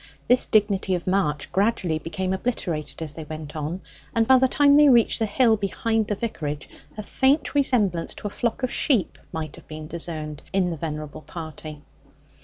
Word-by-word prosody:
This 250 +1 +4
dignity 200 -3 +2
of 175 - -5
march 180 -7 0
gradually 190 -6 +1
became 185 +4 -3
obliterated 175 -8 -3
as 150 -2 -3
they 160 - -7
went 155 -1 -8
on, 155 +5 -4 0.3
and 225 -1 +3
by 260 - +7
the 260 +1 +4
time 285 +2 +5
they 295 0 +7
reached 240 -2 +4
the 220 - +1
hill 225 +2 +4
behind 220 +2 -1
the 205 - -1
vicarage 155 -10 -4 0.3
a 215 - -4
faint 275 +7 +1
resemblance 215 - +1
to - - -12
a 205 - -2
flock 235 +4 -2
of 255 - -1
sheep 235 - +1
might 155 -2 -5
have - - -15
been 155 0 -7
discerned 155 -2 -4
in 185 -2 +2
the - - -3
venerable 150 -1 -5
party. 155 -2 -8
190 Hz, 185 wpm, -24 LUFS, 155-230 Hz, 0.3 s, by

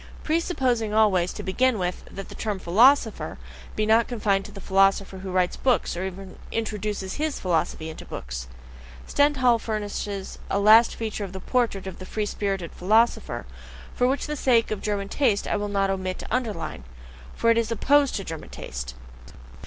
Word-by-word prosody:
Presupposing 260 - 0
always, 190 -5 +3
to - - -7
begin 250 +5 +2
with, 180 -1 -3
that 195 - -8
the - - -10
term 210 -2 -3
"philosopher" 225 +7 +3 0.4
be 215 - +1
not 225 +2 +4
confined 205 -5 0
to 210 - -9
the 200 - -10
philosopher 195 0 +2
who 190 0 -6
writes 180 -1 +1
books, 255 -8 +1
or 175 - -3
even 190 0 -7
introduces 210 -3 -3
HIS 310 -2 -1
philosophy 165 -3 -1
into 160 - -8
books! - - -6 0.6
Stendhal 260 -5 +3
furnishes 205 -3 -4
a - - +1
last 215 +3 +6
feature 220 -2 -4
of 195 -2 -7
the 190 - -5
portrait 230 -3 0
of 190 - -7
the 185 - -8
free 215 -1 -2
spirited 195 -4 -3
philosopher, 220 +6 +1 0.5
which 255 +3 +2
for - - -4
the - - -1
sake 240 -6 +2
of 215 - -2
German 200 -2 -2
taste 220 -3 +1
I - - 0
will 205 0 -3
not 195 -1 +1
omit 185 -1 -3
to - - -8
underline 220 - -3 0.5
for 230 - +3
it 230 - +3
is 230 -1 -2
OPPOSED 280 +4 +3
to 195 - -2
German 160 -4 -7
taste. 65 0 -7
205 Hz, 175 wpm, -25 LUFS, 190-230 Hz, 0.6 s, last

